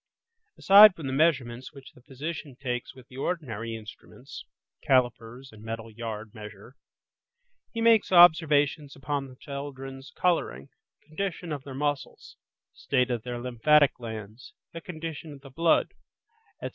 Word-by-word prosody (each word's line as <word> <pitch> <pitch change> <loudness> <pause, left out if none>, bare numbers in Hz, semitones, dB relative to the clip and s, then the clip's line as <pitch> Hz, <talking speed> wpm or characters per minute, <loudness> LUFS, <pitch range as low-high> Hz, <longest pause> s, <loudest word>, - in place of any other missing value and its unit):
Aside 200 0 +8
from 160 - -8
the 130 - -3
measurements 130 -4 0
which 140 -2 -13
the 125 - -20
physician 140 +2 -7
takes 125 -3 -4
with 130 -1 -15
the 125 - -14
ordinary 115 - -4
instruments 115 +4 -11 0.4
(calipers 125 0 0
and 110 -1 -15
metal 115 0 -7
yard 110 -1 -7
measure), 105 +2 -11 1.0
he 230 - -4
makes 230 -3 +4
observations 155 -4 +5
upon 135 +1 -3
the 130 - -14
children's 135 -1 -8
colouring, 165 - -1 0.3
condition 175 +1 -5
of 145 -3 -4
their 135 -2 -8
muscles, 145 0 -4 0.4
state 125 -1 0
of 120 -2 -2
their 120 +1 -6
lymphatic 135 +4 +3
glands, 110 0 -9 0.2
the 165 - -7
condition 160 -3 -7
of 140 - -14
the 135 -1 -13
blood, 165 +4 +2 0.7
etc. - - -3
135 Hz, 140 wpm, -27 LUFS, 120-155 Hz, 1.0 s, Aside